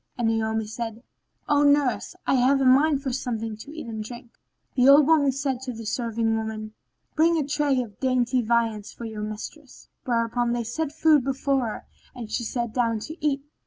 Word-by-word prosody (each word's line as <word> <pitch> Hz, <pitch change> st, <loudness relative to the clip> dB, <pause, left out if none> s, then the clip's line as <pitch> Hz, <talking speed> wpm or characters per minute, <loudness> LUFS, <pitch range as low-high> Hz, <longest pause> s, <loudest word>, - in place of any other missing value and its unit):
and 235 Hz, -2 st, +1 dB
Naomi 220 Hz, 0 st, 0 dB
said, 225 Hz, +1 st, -6 dB, 0.4 s
"O 290 Hz, -1 st, +3 dB
nurse, 285 Hz, +2 st, +2 dB
I -, -, +2 dB
have 265 Hz, +2 st, +4 dB
a 270 Hz, -, +1 dB
mind 275 Hz, +2 st, +4 dB
for 265 Hz, -, -2 dB
something 225 Hz, -4 st, -3 dB
to 220 Hz, -, -11 dB
eat 310 Hz, -2 st, -7 dB
and 220 Hz, -2 st, -5 dB
drink." 240 Hz, +1 st, -10 dB, 0.4 s
The 255 Hz, +1 st, +5 dB
old 285 Hz, +1 st, +8 dB
woman 295 Hz, -3 st, +4 dB
said 270 Hz, -1 st, -2 dB
to 260 Hz, -1 st, -5 dB
the 225 Hz, 0 st, -8 dB
serving 225 Hz, 0 st, -1 dB
women, 220 Hz, -1 st, -4 dB, 0.4 s
"Bring 330 Hz, +2 st, +4 dB
a 295 Hz, -3 st, -1 dB
tray 290 Hz, -2 st, +1 dB
of 210 Hz, -4 st, -14 dB
dainty 255 Hz, -1 st, +1 dB
viands 225 Hz, -2 st, 0 dB
for 235 Hz, -, -9 dB
your 220 Hz, -2 st, -6 dB
mistress;" 215 Hz, +7 st, -8 dB, 0.2 s
whereupon 235 Hz, 0 st, 0 dB
they 240 Hz, -1 st, -1 dB
set 280 Hz, +7 st, -3 dB
food 310 Hz, -2 st, +4 dB
before 270 Hz, 0 st, 0 dB
her 215 Hz, -, -6 dB, 0.3 s
and 230 Hz, -4 st, -8 dB
she 240 Hz, -, -1 dB
sat 235 Hz, -1 st, -3 dB
down 230 Hz, -3 st, +1 dB
to 315 Hz, -, -7 dB
eat. 280 Hz, -2 st, 0 dB
245 Hz, 195 wpm, -25 LUFS, 225-275 Hz, 0.4 s, old